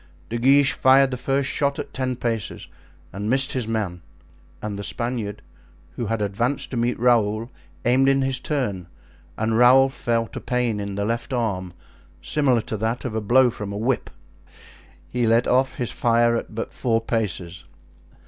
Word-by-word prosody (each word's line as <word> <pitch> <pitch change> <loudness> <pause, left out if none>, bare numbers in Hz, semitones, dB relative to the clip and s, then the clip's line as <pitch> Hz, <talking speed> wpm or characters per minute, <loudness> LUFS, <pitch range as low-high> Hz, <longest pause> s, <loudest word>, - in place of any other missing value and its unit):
De 115 +1 -2
Guiche 140 +3 +5
fired 135 +1 +5
the - - -1
first 135 +2 -1
shot 140 0 0
at 145 -1 -6
ten 130 -1 -2
paces 115 -8 -3 0.5
and 100 +3 -4
missed 135 +2 +3
his 125 -4 -1
man; 105 -6 -2 0.6
and 105 -1 -5
the - - -5
Spaniard, 115 -3 -3 0.5
who - - -4
had 115 -2 -1
advanced 120 +7 -2
to - - -4
meet 120 +1 0
Raoul, 115 -1 +2 0.3
aimed 130 +3 +4
in 135 0 +3
his 130 0 0
turn, 120 - -2 0.5
and 110 +1 0
Raoul 130 +2 +6
felt 115 -3 -2
a - - -5
pain 125 -4 -1
in 100 -1 -4
the 100 0 -1
left 115 +3 -2
arm, 100 -7 -2 0.5
similar 125 - +2
to 110 - -5
that 110 +4 -2
of 125 - -3
a 110 - -1
blow 125 +4 +4
from 105 -2 -6
a 100 - -4
whip. 120 +4 -1 1.0
He 120 -2 0
let 115 +2 +3
off 130 +2 +2
his 120 -1 -3
fire 120 0 +2
at 115 - -5
but 115 - -4
four 115 -3 +1
paces. 95 -6 -3
120 Hz, 175 wpm, -23 LUFS, 110-130 Hz, 1.0 s, Raoul